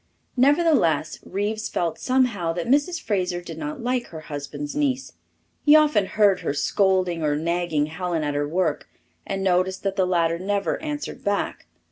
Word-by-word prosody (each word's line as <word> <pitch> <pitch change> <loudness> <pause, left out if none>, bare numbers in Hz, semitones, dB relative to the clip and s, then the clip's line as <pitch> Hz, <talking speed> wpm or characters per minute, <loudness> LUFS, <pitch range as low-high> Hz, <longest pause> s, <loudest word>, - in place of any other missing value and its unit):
Nevertheless, 275 - +3
Reeves 215 +3 -3
felt 170 -2 -2
somehow 240 -10 +1
that 170 0 -3
Mrs. 290 +7 +2
Fraser 180 -4 -1
did 175 - -9
not 300 -4 -5
like 250 0 -1
her 160 -2 -9
husband's 145 -1 -6
niece. 270 -3 -1 0.5
He 295 0 +7
often 300 -11 +4
heard 205 -4 +3
her 140 - -2
scolding 185 +1 +1
or 150 -1 +1
nagging 165 -1 0
Helen 165 0 -3
at 145 -1 -1
her 145 0 -1
work, 180 +5 -1 0.4
and 195 -1 -2
noticed 185 0 +1
that 195 0 -2
the 185 -1 +2
latter 170 -2 +1
never 200 +2 -1
answered 295 -1 -5
back. 200 - -2
190 Hz, 160 wpm, -24 LUFS, 165-245 Hz, 0.5 s, He